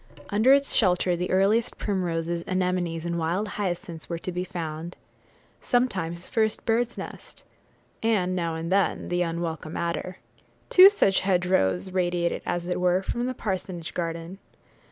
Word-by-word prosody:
Under 220 +5 +4
its 280 0 +4
shelter 180 -3 +3
the 180 +1 -3
earliest 205 +5 +2
primroses, 170 -4 -2
anemones, 180 -3 -1
and 170 0 -1
wild 175 +6 -1
hyacinths 175 -5 -4
were 170 - -2
to 185 - -5
be 180 +1 -2
found; 165 -1 -6 0.6
sometimes, 185 -9 0
the - - -17
first 220 -1 0
bird's 235 +1 +1
nest; - - -9 0.6
and, 195 -5 +1
now 170 -2 -1
and 165 +2 -4
then, 195 0 +1
the 175 0 0
unwelcome 165 -2 -3
adder. 170 +2 -3 0.5
Two 375 +1 +10
such 200 - +2
hedgerows 180 - +1
radiated, 175 -2 0
as 175 0 -2
it 180 0 -1
were, 180 +1 +2
from 240 +5 -2
the 255 - -3
parsonage 185 -5 -4
garden. 170 +2 -4
180 Hz, 150 wpm, -26 LUFS, 170-195 Hz, 0.6 s, Two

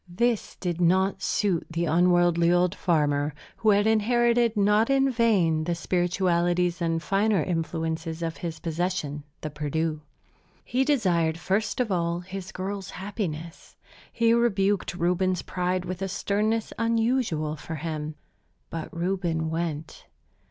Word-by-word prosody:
This 235 +5 0
did 175 -2 -3
not 190 +3 +2
suit 190 -3 0
the 165 +1 -1
unworldly 175 0 +3
old 175 0 +3
farmer, 150 -6 +1 0.2
who 220 - +2
had 205 0 +4
inherited, 235 +1 +3
not 210 +3 +3
in 270 0 +3
vain, 190 -10 +2
the 170 0 0
spiritualities 175 0 +1
and 165 -1 0
finer 200 -3 +2
influences 165 -1 -3
of 165 -1 -3
his 165 -2 -5
possession, 165 -3 -2 0.2
the 155 - -4
Perdu. 155 +1 -2 0.6
He 255 +2 +1
desired, 175 - +2
first 205 +7 -1
of 240 -4 0
all, 170 -1 0
his 190 +1 -7
girl's 195 0 -5
happiness. 180 -4 -6 0.4
He 230 -1 +3
rebuked 205 -5 +1
Reuben's 180 +1 +1
pride 180 0 -1
with 185 +1 -5
a 195 - -1
sternness 210 +3 -1
unusual 230 -9 +1
for 160 +1 -7
him. 155 0 -4 0.6
But 165 -1 -5
Reuben 170 -2 -1
went. 160 -2 -4
180 Hz, 130 wpm, -26 LUFS, 165-205 Hz, 0.6 s, had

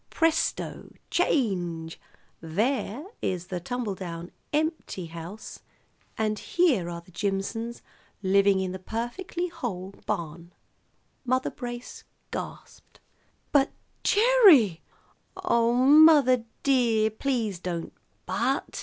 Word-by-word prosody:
Presto! 325 -1 0 0.2
Change! 175 - 0 0.4
There 220 - -1 0.2
is 180 -1 -2
the 180 - -3
tumble 225 +3 -3
down 175 -2 -7 0.8
house 170 +6 -8
empty, - - -32 0.6
and 215 -1 0
here 270 - +2
are 170 0 -6
the 180 +2 -20
Jimsons 210 +5 -3 0.4
living 195 0 +4
in 190 -1 -2
the 185 - -6
perfectly 240 - -4
whole 195 - -5 0.2
barn." 170 +1 -4 0.7
Mother 255 0 0
Brace 240 -1 -7 0.3
gasped. - - -8 0.5
"But 280 -1 +3 0.3
Gerry 400 - +6 0.3
" - - -43
"Oh, 235 -11 +2
mother 275 -2 +6 0.2
dear, 230 -5 +3
please 220 -5 -2
don't 170 -2 -4 0.3
'but.' - - -1
220 Hz, 100 wpm, -27 LUFS, 180-260 Hz, 0.8 s, Gerry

